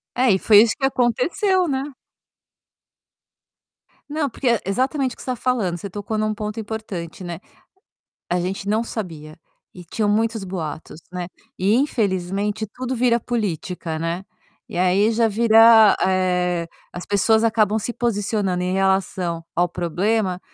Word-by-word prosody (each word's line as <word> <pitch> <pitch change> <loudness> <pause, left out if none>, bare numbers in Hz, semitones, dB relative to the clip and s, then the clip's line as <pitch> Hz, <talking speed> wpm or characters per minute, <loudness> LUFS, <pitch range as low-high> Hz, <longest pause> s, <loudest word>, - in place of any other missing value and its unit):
É 250 0 +3
e 190 - +3
foi 210 +1 +7
isso 230 - +1
que 270 - +2
aconteceu, 330 - +1
né. 275 +1 -2 2.2
Não 295 -1 -1
porque 255 - -2
é 235 -2 +2
exatamente 260 +6 0
o - - -29
que - - -11
você - - -4
está 250 - -1
falando, 230 -8 0
você 195 +3 -7
tocou 205 +3 -4
em - - 0
um 215 0 0
ponto 210 +1 -5
importante, 205 -6 -6
né. 175 -1 -6 0.9
A 180 - +1
gente 190 +2 -4
não 215 +3 +1
sabia, 165 -10 -7 0.3
e 180 - -11
tinham 210 +5 -1
muitos 220 0 0
boatos, 165 -4 -6
né. 180 -1 -4 0.3
E 195 +3 +2
infelizmente 205 -4 -1
tudo 255 0 -4
vira 240 -1 +2
política, 180 -7 -3
né. 165 +3 -3 0.4
E - - -7
aí 185 +4 +3
já 230 0 +2
vira, 225 0 +6
eh, 180 -2 0 0.3
as 175 - -7
pessoas 220 +2 +3
acabam 220 -1 +2
se 240 - -3
posicionando 205 -5 -1
em 180 - -1
relação 190 -3 0
ao 175 +1 +2
problema 180 +3 -1
205 Hz, 150 wpm, -21 LUFS, 180-230 Hz, 2.2 s, foi